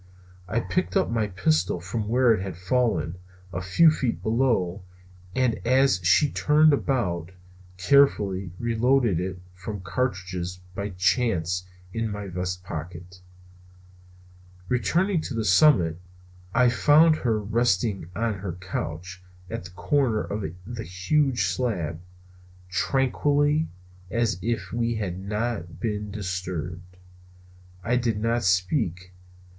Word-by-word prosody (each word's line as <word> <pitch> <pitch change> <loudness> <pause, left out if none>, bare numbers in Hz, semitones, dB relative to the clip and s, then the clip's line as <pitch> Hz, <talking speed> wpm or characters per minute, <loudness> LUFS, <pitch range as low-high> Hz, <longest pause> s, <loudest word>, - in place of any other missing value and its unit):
I 110 +5 0
picked 185 - -1
up 190 - +1
my 110 -2 +1
pistol 90 -3 +1
from 105 +5 -4
where 120 +1 +4
it 105 - -1
had 95 -3 -5
fallen, 95 -3 0 0.4
a 90 - -3
few 125 - +5
feet 130 -6 -2
below, 110 -6 +1 0.5
and 125 -3 +1
as 130 -3 +3
she 120 - +4
turned 155 0 +4
about, 90 - -1 0.5
carefully 100 -6 +3
reloaded 120 -3 +2
it 90 0 -4
from 95 +2 -6
cartridges 90 -3 -3
by 100 +2 -3
chance 90 -2 0 0.3
in 115 -1 -1
my 105 -1 -5
vest 90 0 -4
pocket. 90 +2 -8 1.5
Returning 165 - +1
to 135 - -5
the 110 -1 -1
summit, 90 - +4 0.5
I 125 +3 +4
found 155 +6 +5
her 115 -6 0
again 105 0 -6
resting 105 -5 +1
on 110 -3 -1
her 95 -3 -4
couch 90 0 -6 0.3
at - - -5
the - - -8
corner 110 +4 +1
of 105 0 -4 0.2
the 115 +1 -6
huge 115 - +1
slab, 90 -4 -2 0.7
tranquilly 145 - +1 0.4
as 115 -4 0
if 115 +3 -2
we 115 0 0
had 95 -4 -3
not 100 -4 -3
been 105 -1 -2
disturbed. 90 -3 -5 0.9
I 120 +4 +1
did 115 -4 0
not 115 +2 +1
speak. 90 - 0
105 Hz, 125 wpm, -25 LUFS, 90-120 Hz, 1.5 s, few